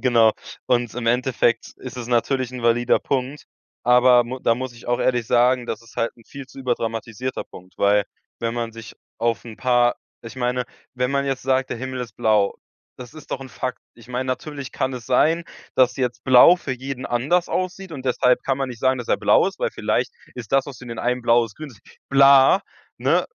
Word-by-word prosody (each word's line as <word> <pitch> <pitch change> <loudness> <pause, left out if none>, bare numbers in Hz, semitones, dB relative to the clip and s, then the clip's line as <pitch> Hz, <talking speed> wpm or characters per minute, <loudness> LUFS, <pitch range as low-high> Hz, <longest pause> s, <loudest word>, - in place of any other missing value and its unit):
genau. 115 -3 +4 0.3
Und 120 -1 +1
im 120 -1 -4
Endeffekt 120 -1 +1
ist 130 0 -9
es 120 -1 -6
natürlich 125 +1 0
'n 125 -2 -7
valider 120 +1 +3
Punkt, 135 +2 -3 0.4
aber 125 0 +6
mu 130 +2 -6
da 115 - +2
muss 130 -1 -5
ich 120 - -14
auch 120 - +1
ehrlich 120 -3 +1
sagen, 125 +1 +3
das 110 - -4
ist 115 - -18
halt 115 - 0
'n 115 - -20
viel 140 -1 -9
zu 130 - -15
überdramatisierter 120 -1 -3
Punkt, 90 0 -15
weil, 100 0 +3 0.4
wenn 115 0 -1
man 115 -1 -3
sich 115 -1 -11 0.2
auf 115 0 -1
'n 115 -2 -10
paar 120 -1 +3 0.3
ich 115 - -9
meine, 125 0 -1 0.3
wenn 125 0 -1
man 140 0 +1
jetzt 135 -1 -2
sagt, 130 0 0
der - - -2
Himmel 130 0 -5
ist 115 -5 -7
blau, 105 -2 +2 0.4
das 125 +3 -11
ist 155 -2 -13
doch - - -3
'n 135 - -8
Fakt. 125 +1 -4 0.2
Ich 120 0 -17
meine, 125 +1 -2
natürlich 140 +1 -5
kann 130 - -1
es 125 -2 -8
sein, 160 +6 +2 0.3
dass 130 -1 +4
jetzt 125 -2 -2
blau 130 +7 +8
für 140 - -5
jeden 130 0 -5
anders 145 +9 +1
aussieht, 185 0 -3
und 135 -4 -7
deshalb 125 0 +2
kann 135 -1 0
man 135 -1 -2
nicht 120 -2 -9
sagen, 130 0 +2
dass 120 - -7
er - - +3
blau - - +4
ist, - - -11
weil - - 0
vielleicht - - -1 0.2
ist 120 -3 -8
das, 135 -1 +3
was 135 -4 -9
für 125 - -11
den 115 -1 -7
einen 125 +1 -1
blau 120 0 +4
ist, 110 -2 -11
grün 155 -2 -8
ist, 110 -5 -18 0.3
bla, 140 +5 +6 0.4
ne? - - +2
125 Hz, 220 wpm, -22 LUFS, 120-130 Hz, 0.4 s, blau